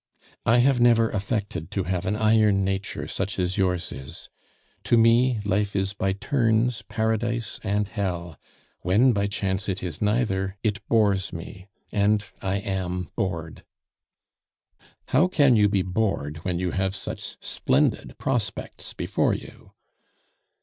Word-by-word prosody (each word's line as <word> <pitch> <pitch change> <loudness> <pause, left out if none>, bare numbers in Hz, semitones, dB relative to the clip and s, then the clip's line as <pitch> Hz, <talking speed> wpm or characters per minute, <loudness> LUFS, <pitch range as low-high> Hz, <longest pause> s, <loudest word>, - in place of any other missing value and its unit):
"I 115 - +5
have 125 0 +4
never 115 -2 +4
affected 100 -5 -3
to 95 - -2
have 90 0 -2
an 105 - +1
iron 110 -3 +3
nature 95 0 -3
such 95 +1 -2
as 90 +1 0
yours 90 -2 +1
is. 70 +4 -9 0.6
To 120 - +4
me 115 +1 +4
life 100 0 0
is 95 0 0
by 95 -1 0
turns 115 +1 +1
paradise 110 +1 -2
and 100 +1 0
hell; 90 -6 -3 0.4
when 110 +9 +3
by 100 -1 +1
chance 100 0 -2
it 95 0 -3
is 85 -5 -5
neither, 105 -3 0
it 110 -1 0
bores 100 -5 +2
me; 90 +3 -9 0.2
and 105 0 +2 0.2
I 95 0 -1
am 95 -2 -3
bored 85 -3 -3 0.7
" - - -34
"How 150 +8 +4
can 145 -8 +4
you 105 -2 +4
be 100 -2 +1
bored 90 -6 -1
when 90 +2 -3
you 90 0 -1
have 95 0 -1
such - - -5
splendid - - 0
prospects - - -3
before - - +1
you?" - - -11
100 Hz, 145 wpm, -25 LUFS, 95-110 Hz, 0.7 s, I